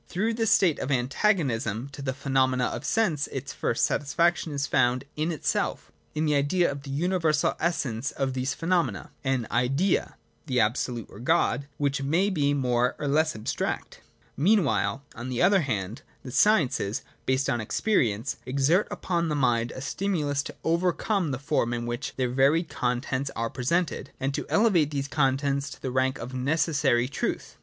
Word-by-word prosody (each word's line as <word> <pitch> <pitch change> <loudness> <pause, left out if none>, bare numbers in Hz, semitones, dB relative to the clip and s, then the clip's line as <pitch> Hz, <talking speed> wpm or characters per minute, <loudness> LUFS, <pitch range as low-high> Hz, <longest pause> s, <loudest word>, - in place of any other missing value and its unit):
Through 215 - -1
this 225 -1 0
state 175 -6 +4
of 130 - -3
antagonism 130 - 0
to 140 - -9
the 135 -1 -1
phenomena 130 -2 +1
of - - -4
sense 170 -11 +1
its 135 0 -6
first 115 - +1
satis 140 -1 -2
faction 170 -1 +2
is 140 -1 -1
found 125 -2 +2
in 155 +3 -1
itself, 155 - -2 0.2
in 155 +1 0
the 150 - +2
Idea 145 +4 +2
of 140 0 -6
the 140 - -10
universal 160 +1 +1
essence 140 -7 -1
of 135 -3 -2
these 130 +1 -2
phenomena: 165 - -1
an 130 -3 0
Idea 135 - +1 0.3
(the 125 -3 +1
Absolute, 115 +1 0
or 100 - -13
God) 140 +1 +1
which 140 -1 0
may 170 +9 +1
be 145 -6 +1
more 125 -2 +1
or 145 - -3
less 155 +3 +2
abstract. 110 0 -3 0.3
Mean 195 - +4
while, 140 -1 0
on 120 +3 -6
the 125 +3 0
other 195 +2 +5
hand, 110 - -3 0.2
the 130 - -7
sciences, 135 - +2 0.2
based 130 +1 +1
on 120 -4 0
experi 120 - +1
ence, 110 +7 -4
exert 140 +9 +2
upon 170 -2 -1
the 150 - 0
mind 120 -4 +2
a 130 - -7
stimulus 150 -3 -1
to - - -8
overcome 175 +2 +1
the 135 - -2
form 120 -3 0
in 120 0 -3
which 120 +3 -4
their 130 -1 0
varied 140 +6 +3
contents 130 +2 -1
are 115 0 -2
presented, 140 +3 -1
and, 135 +1 -1
to - - -3
elevate 195 -9 +3
these 140 -2 -3
contents 140 0 0
to - - -10
the 130 - -4
rank 130 +1 +1
of 125 +3 -7
necessary 135 -2 +1
truth. 140 - -3
140 Hz, 175 wpm, -27 LUFS, 125-160 Hz, 0.3 s, other